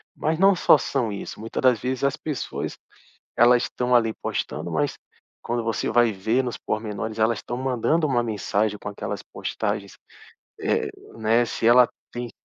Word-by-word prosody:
mas 160 +2 -1
não 195 0 +6
só 150 - +5
são 120 -6 -1
isso, 100 - -7
muita 115 +1 -4
das 125 -4 +4
vezes 130 +1 -3
as 140 +2 +1
pessoas 150 -6 -4 0.6
elas 120 +1 +5
estão 125 0 -1
ali 115 -2 +3
postando, - - -4
mas - - 0 0.5
quando 120 0 -2
você 115 -1 -1
vai 120 0 +4
ver 110 +6 0
nos 120 -2 -4
pormenores 110 0 -4
elas 110 +1 +2
estão 120 - -5
mandando 135 +5 +1
uma 120 -4 +1
mensagem 105 -1 -1
com - - -6
aquelas 100 - -5
postagens, - - -4 0.6
eh - - 0 0.3
né, 115 +2 +3
se 115 - -2
ela 120 +1 +7 0.2
tem 120 -1 -5
120 Hz, 165 wpm, -24 LUFS, 110-130 Hz, 0.6 s, ela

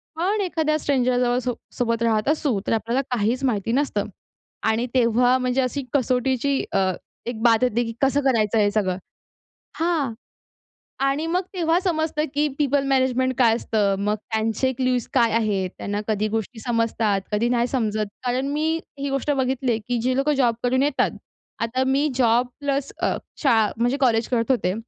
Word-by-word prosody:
पण 395 +5 0
एखाद्या 320 -4 0
स्ट्रेंजरजवळ 250 -3 +1
सो 250 -1 -1 0.2
सोबत 230 -1 0
राहत 220 +1 +1
असू 290 -9 +1
तर - - +2
आपल्याला 235 +4 0
काहीच 245 +3 0
माहिती 225 -2 0
नसतं 280 +3 0 0.7
आणि 230 +3 0
तेव्हा 245 +1 +3
म्हणजे 255 +1 0
अशी 265 +2 -2
कसोटीची 260 +1 +1
अ, 190 -1 +2 0.3
एक 230 -2 -5
बात 230 -2 +5
येते 240 -1 +2
की 230 - -5
कसं 275 +1 +3
करायचं 225 -5 +2
हे 205 -1 +4
सगळं? 190 -4 0 0.8
हां. 320 -8 0 0.9
आणि 275 +3 0
मग 360 +3 +1
तेव्हा 340 -1 +2
समजतं 315 -4 0
की 295 +1 +2
पिपल 285 -1 +2
मॅनेजमेंट 260 -1 +2
काय 230 -3 +4
असतं? 205 -4 0
मग 210 +1 0
त्यांचे 220 +4 -1
क्यूज 255 -2 0
काय 235 -3 +3
आहेत? 205 -5 0
त्यांना 205 +1 -3
कधी 215 0 0
गोष्टी 225 +1 -4
समजतात, 230 -4 +1
कधी 225 +3 +1
नाही 240 -1 +2
समजत. 215 -4 -1 0.2
कारण 250 +2 0
मी 315 +2 +1 0.2
ही 280 0 -2
गोष्ट 275 +2 -1
बघितली 260 -2 0
आहे, 225 - 0
की 245 - 0
जी 255 +1 +1
लोकं 285 +2 +2
जॉब 240 -4 +2
करून 260 +2 +2
येतात. 285 -1 +1 0.5
आता 255 +3 0
मी 280 +3 +2
जॉब 245 -1 +3
प्लस 280 -1 -1
अ, - - +1 0.3
शाळा 225 -6 +3
म्हणजे 245 +4 +1
कॉलेज 230 -3 +3
करत 235 0 +1
होते. 185 -7 +1
250 Hz, 170 wpm, -23 LUFS, 225-275 Hz, 0.9 s, बात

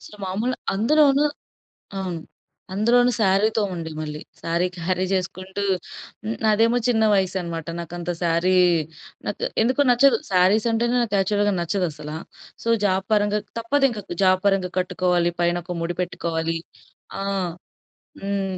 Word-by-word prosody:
అసలు 210 - -13
మామూలు 215 +7 -1 0.2
అందులోనూ 280 +6 +4 0.8
అవును. 180 -3 -3 0.5
అందులోనూ 240 +5 +4
సారీతో 210 +3 +3
ఉండే 165 -2 -5
మళ్ళీ. 150 -1 -5 0.2
సారీ 170 +2 0
క్యారీ 185 +2 -1
చేసుకుంటూ 185 +1 -3 0.8
నాదేమో 225 +3 +4
చిన్న 220 -2 +3
వయసు 190 -1 +1
అనమాట. 165 -2 -5
నాకు 170 0 -7
అంత 175 0 -3
సారీ 170 +2 +2 0.7
నాకు - - -4 0.2
ఎందుకో 255 +5 +2
నచ్చదు. 245 0 +5
సారీస్ 190 +5 +4
అంటేనే 235 +2 +1
నాకు 210 -3 -2
యాక్చువల్‌గా 205 +1 +1
నచ్చదసల. 160 -4 -2 0.5
సో, - - -6 0.2
జాబ్ 190 0 +1
పరంగా 210 0 +2 0.2
తప్పదింకా 240 -3 +1 0.2
జాబ్ 185 0 +4
పరంగా 190 -2 +1
కట్టుకోవాలి. 180 -1 +1
పైన 175 0 +2
ఒక 180 - -4
ముడి 175 +1 -2
పెట్టుకోవాలి. 165 -2 -2 0.6
ఆ! - - -3 1.0
హ్మ్. 195 -1 -2
190 Hz, 125 wpm, -23 LUFS, 175-220 Hz, 1.0 s, నచ్చదు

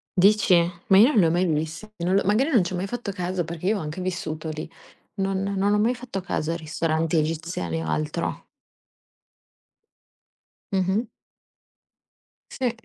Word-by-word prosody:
Dici? 200 +3 +4 0.4
Ma 190 - +6
io 225 +5 +8
non 220 - +3
l'ho 165 -3 +4
mai 180 +2 +2
vist 160 +6 -2
non 175 +3 0
l'ho 200 - +3
magari 230 +9 +3
non 225 -9 +5
ci 180 - -4
ho - - -1
mai 185 +2 -2
fatto 240 -2 -4
caso 180 -1 -2
perché 170 +2 -5
io 215 0 +2
ho - - -4
anche 155 +4 -5
vissuto 160 -3 -3
lì. 155 +1 -5 0.5
Non 195 -1 -1
non 200 +1 +1
ho 210 - +3
mai 230 +4 +3
fatto 235 -6 -5
caso 165 -3 -2
a - - -1
ristoranti 160 0 -1
egiziani 155 - -2
o - - -5
altro. 75 0 -2 2.3
Mh-mh. 190 +4 +1 1.4
Sì. 255 -3 -1
185 Hz, 165 wpm, -25 LUFS, 160-200 Hz, 2.3 s, io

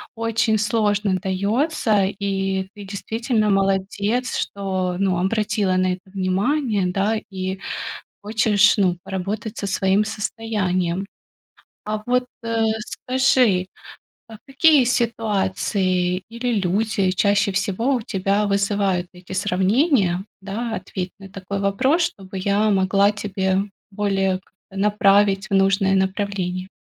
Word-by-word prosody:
очень 225 -1 +1
сложно 205 -2 +1
даётся, 210 - +1
и 195 -1 -2
ты 205 - -9
действительно 220 +2 -1
молодец, 195 +5 0
что, 185 -2 -2
ну, 190 -3 +1
обратила 205 0 0
на 185 0 +2
это 185 +1 -11
внимание, 200 +3 0
да, 200 +4 0 0.2
и 190 0 -4 0.6
хочешь, 210 -1 +3
ну, 180 -3 +2
поработать 200 +3 -4
со 200 - -3
своим 195 +2 +2
состоянием. 200 -4 -2 0.8
А 215 0 -3
вот, 250 0 +1 0.2
а, 230 -1 0 0.2
скажи, 250 -6 +2 0.8
какие 285 -1 +4
ситуации 190 -6 0
или 235 +1 -2
люди 195 +1 +1
чаще 200 +2 +2
всего 200 +7 0
у 240 - -2
тебя 200 +1 0
вызывают 200 -2 0
эти 180 +1 -11
сравнения, 190 - +2 0.2
да? 220 +4 -4
Ответь 185 -1 -5
на 195 - -10
такой 195 +1 -5
вопрос, 260 - +2
чтобы 195 - -5
я 200 +3 +1
могла 195 +1 +3
тебе 190 -2 -1 0.3
более 195 -2 0
как-то 190 +1 -17
направить 200 -1 +3
в - - -3
нужное 195 0 +3
направление. 190 -1 -1
200 Hz, 115 wpm, -22 LUFS, 190-220 Hz, 0.8 s, какие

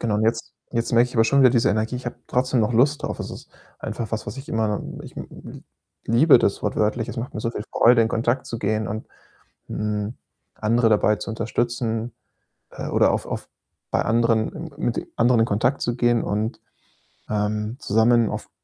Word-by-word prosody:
Genau 110 -3 0
und 105 - 0
jetzt 115 0 -1 0.2
jetzt 115 0 -1
merke 120 +1 +4
ich 125 - -11
aber 115 - +5
schon 140 +5 +3
wieder 130 - +8
diese 120 -1 +3
Energie. 110 +3 0
Ich 125 - -10
habe 120 - -4
trotzdem 125 0 +1
noch 110 +3 +1
Lust 145 +5 +3
drauf. - - -3
Es - - -5
ist - - -10 0.3
einfach 115 -2 -5
was, 110 -1 -3
was 105 +6 -6
ich 135 - -8
immer 110 -2 0 0.2
ich - - -12
m - - -6
m - - -11
l - - -12 0.4
liebe 125 +4 +6
das 100 - 0
wortwörtlich. 110 +2 0
Es - - -7
macht 120 +3 -4
mir 110 - -4
so 115 - -1
viel 105 - -5
Freude, 120 0 +5
in 110 - +2
Kontakt 120 +3 0
zu 115 - -4
gehen 110 0 -1
und, 110 +2 -5 0.6
hm, 105 +1 -2 0.4
andere 115 +2 +2
dabei 105 0 +3
zu 90 - -7
unterstützen, 115 0 -2 0.6
äh, - - -6
oder - - +3
auf - - -2
auf - - -5 0.4
bei - - +2
anderen 115 -1 +2
m 160 0 -7
mit 120 - -2
anderen 115 0 +4
in - - +4
Kontakt 120 +6 0
zu 120 0 -1
gehen 120 -2 +2
und, 105 +3 -2 0.7
ähm, 105 +2 -1
zusammen 115 +1 +3
auf - - -5
115 Hz, 205 wpm, -23 LUFS, 110-120 Hz, 0.7 s, wieder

